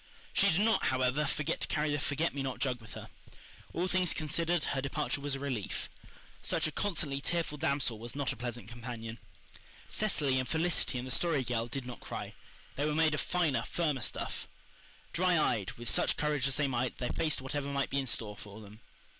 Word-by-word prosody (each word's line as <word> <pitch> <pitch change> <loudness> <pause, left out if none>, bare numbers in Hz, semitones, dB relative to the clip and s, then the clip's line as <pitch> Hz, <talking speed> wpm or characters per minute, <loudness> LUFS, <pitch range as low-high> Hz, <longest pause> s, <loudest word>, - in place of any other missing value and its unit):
She 200 - +5
did 180 +2 +3
not, 225 +1 +4
however, 130 +3 +2
forget 145 +1 -1
to - - +1
carry 150 0 +1
the 145 - +1
forget 150 +3 0
me 140 - -2
not 135 -2 -2
jug 125 -3 0
with 110 - -11
her. - - -7 0.6
All 175 +2 0
things 185 -2 +2
considered, 165 +2 +1
her 135 - 0
departure 145 +1 -1
was 140 -1 -1
a - - -5
relief. 130 -8 -2 0.5
Such - - +1
a 155 - +1
constantly 150 -7 -1
tearful 165 -2 -1
damsel 140 -6 +1
was 120 +3 -7
not 140 -2 0
a - - -9
pleasant 120 -3 -5
companion. 115 -1 -6 0.7
Cecily 150 -11 +2
and 130 - -2
Felicity 160 -5 +2
and 125 - -3
the 130 - -5
Story 160 -4 +2
Girl 115 -2 -1
did 130 +2 -4
not 125 -1 -7
cry. - - -5 0.4
They 145 - +1
were 150 - 0
made 160 -1 +4
of 155 - +1
finer, 155 -9 +2
firmer 150 -6 +1
stuff. - - -3 0.7
Dry 180 0 +4
eyed, 115 -10 +2
with 120 0 -8
such - - +3
courage 150 -3 +1
as 135 - -1
they 150 -2 +2
might, 125 -1 0
they 125 - -1
faced 160 -2 +1
whatever 140 +2 -2
might 140 -1 0
be 140 - +2
in 135 - -2
store 105 -3 0
for 105 +1 -10
them. 105 0 -12
140 Hz, 205 wpm, -32 LUFS, 125-155 Hz, 0.7 s, She